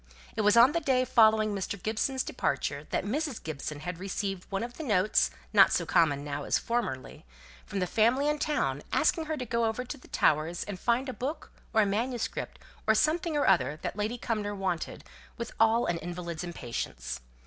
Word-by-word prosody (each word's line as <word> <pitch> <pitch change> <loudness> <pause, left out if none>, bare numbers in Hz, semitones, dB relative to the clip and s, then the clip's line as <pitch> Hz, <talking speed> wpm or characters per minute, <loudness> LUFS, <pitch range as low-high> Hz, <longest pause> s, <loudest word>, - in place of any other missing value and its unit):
It - - 0
was 210 +2 +4
on 240 +4 +8
the 335 - +1
day 260 -5 +2
following 220 -3 +4
Mr. 200 0 -3
Gibson's 230 +6 -1
departure 140 - -2
that - - 0
Mrs. 280 +3 -1
Gibson 150 -1 -5 0.2
received 195 0 -4
one 195 +2 -1
of 240 +1 -7
the 320 - -5
notes, 210 -5 +3 0.2
not - - +7
so - - +1
common 145 -4 +3
now 145 0 -4
as - - +2
formerly, 215 - -3 0.4
from 200 - -5
the 185 - +1
family 235 +9 +2
in 300 0 +1
town, 300 0 0
asking 325 -2 +2
her 310 0 -2
to 255 - -4
go 235 0 0
over 225 +3 -1
to 285 - -6
the - - -17
Towers, 155 +3 +1
and 200 -3 -6
find 245 +5 +1
a 260 - -3
book, 275 +7 -5 0.2
or 220 -1 +4
a - - +1
manuscript, 230 +4 -2 0.3
or 220 - +5
something 315 +4 +1
or 285 - +2
other 170 -5 +3
that - - -3
Lady 210 +4 -2
Cumnor 210 -3 -2
wanted 190 -4 -3 0.3
with 235 -1 -5
all 225 +1 +4
an 170 -1 -1
invalid's 170 -1 -5
impatience. 115 - -5
215 Hz, 190 wpm, -29 LUFS, 175-250 Hz, 0.4 s, on